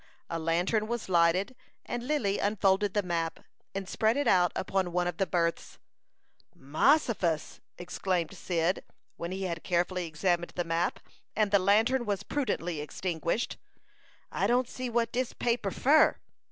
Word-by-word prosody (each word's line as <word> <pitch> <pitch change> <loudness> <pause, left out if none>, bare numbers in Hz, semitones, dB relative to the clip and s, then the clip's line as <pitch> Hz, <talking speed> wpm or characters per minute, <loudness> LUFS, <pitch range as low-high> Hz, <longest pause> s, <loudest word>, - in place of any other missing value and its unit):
A 165 - -2
lantern 175 +7 +1
was 235 -3 -4
lighted, 180 +7 +3 0.3
and 240 - -3
Lily 240 -7 0
unfolded 200 -1 +2
the 205 - +2
map, 165 -2 -2 0.3
and 195 -1 -3
spread 220 +5 +1
it 285 - 0
out 180 -2 +4
upon 190 -1 -1
one 180 0 +1
of 175 - -3
the 195 - +1
berths. 170 -2 -1 0.8
"Mossifus!" 170 - +1 0.2
exclaimed 180 -1 -2
Cyd, 175 +1 0 0.3
when 170 +1 -4
he 190 +1 -3
had 170 -3 -3
carefully 180 0 0
examined 175 +2 -1
the 175 - 0
map, 165 +1 -1 0.3
and 210 -2 +2
the 200 - +5
lantern 225 +6 +3
was 200 -2 -1
prudently 175 - -2
extinguished. 170 +6 -2 0.7
"I - - 0
don't 250 +1 +2
see 255 0 -5
what 235 -1 0
dis 250 0 -1
paper 235 -4 0
fur." 290 +10 +4
190 Hz, 150 wpm, -29 LUFS, 170-225 Hz, 0.8 s, the